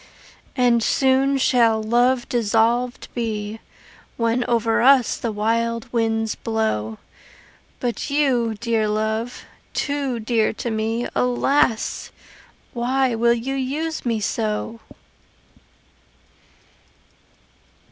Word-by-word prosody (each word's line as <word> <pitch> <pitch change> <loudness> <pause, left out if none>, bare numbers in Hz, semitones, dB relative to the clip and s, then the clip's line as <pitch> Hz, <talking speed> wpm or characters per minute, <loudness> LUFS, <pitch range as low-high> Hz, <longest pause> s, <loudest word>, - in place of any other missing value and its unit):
And 245 -2 +3
soon 270 +3 +2
shall 235 -4 +3
love 240 +3 +2
dissolved 235 +2 +1
be 220 -2 -3 0.6
When 230 +1 +1
over 230 -1 +1
us 260 -1 +5
the 230 - -3
wild 230 +2 -1
winds 225 -1 0
blow 165 - -2 0.8
But 245 +3 -3
you, 255 -6 +1
dear 230 -2 0
love, 220 +3 -2 0.3
too 280 -4 -1
dear 225 -1 +1
to 235 +1 -4
me, 225 +2 -1
Alas! 250 -1 +1 0.6
why 255 +1 +1
will 235 +1 +3
you 245 +4 -3
use 290 +5 -3
me 230 -3 0
so? 215 +1 -2
235 Hz, 95 wpm, -22 LUFS, 220-250 Hz, 0.8 s, us